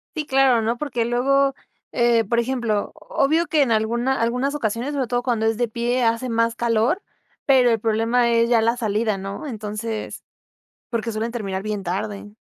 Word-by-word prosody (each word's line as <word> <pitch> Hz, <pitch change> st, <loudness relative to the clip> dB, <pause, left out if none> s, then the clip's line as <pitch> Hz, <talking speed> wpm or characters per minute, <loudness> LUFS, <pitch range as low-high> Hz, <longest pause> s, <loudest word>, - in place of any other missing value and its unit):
Sí, 305 Hz, -2 st, -3 dB
claro, 265 Hz, -3 st, +4 dB
¿no?, 230 Hz, +2 st, -1 dB
porque 245 Hz, -4 st, -2 dB
luego, 275 Hz, +3 st, +2 dB, 0.4 s
eh, 235 Hz, -1 st, +3 dB
por 235 Hz, +3 st, -1 dB
ejemplo, 235 Hz, -4 st, -1 dB
obvio 315 Hz, +5 st, 0 dB
que 305 Hz, -3 st, +3 dB
en 240 Hz, -, -1 dB
alguna 235 Hz, +4 st, +1 dB
algunas 250 Hz, +4 st, 0 dB
ocasiones, 240 Hz, 0 st, -2 dB
sobre 270 Hz, -4 st, -1 dB
todo 245 Hz, 0 st, -1 dB
cuando 225 Hz, -3 st, 0 dB
es 225 Hz, -1 st, 0 dB
de 240 Hz, -, +1 dB
pie, 240 Hz, +3 st, -1 dB
hace 230 Hz, +2 st, 0 dB
más 230 Hz, 0 st, +1 dB
calor, 235 Hz, -, +1 dB, 0.5 s
pero 255 Hz, -3 st, +5 dB
el 225 Hz, -, +1 dB
problema 230 Hz, +2 st, +1 dB
es 230 Hz, 0 st, +3 dB
ya 235 Hz, -2 st, +3 dB
la 230 Hz, +2 st, +1 dB
salida, 215 Hz, -2 st, 0 dB
¿no? 195 Hz, +10 st, -6 dB
Entonces, 215 Hz, -1 st, -5 dB, 0.7 s
porque 230 Hz, -1 st, -2 dB
suelen 220 Hz, +2 st, -2 dB
terminar 195 Hz, -5 st, -4 dB
bien 210 Hz, -2 st, -4 dB
tarde. 205 Hz, +3 st, -4 dB
235 Hz, 180 wpm, -22 LUFS, 220-250 Hz, 0.7 s, pero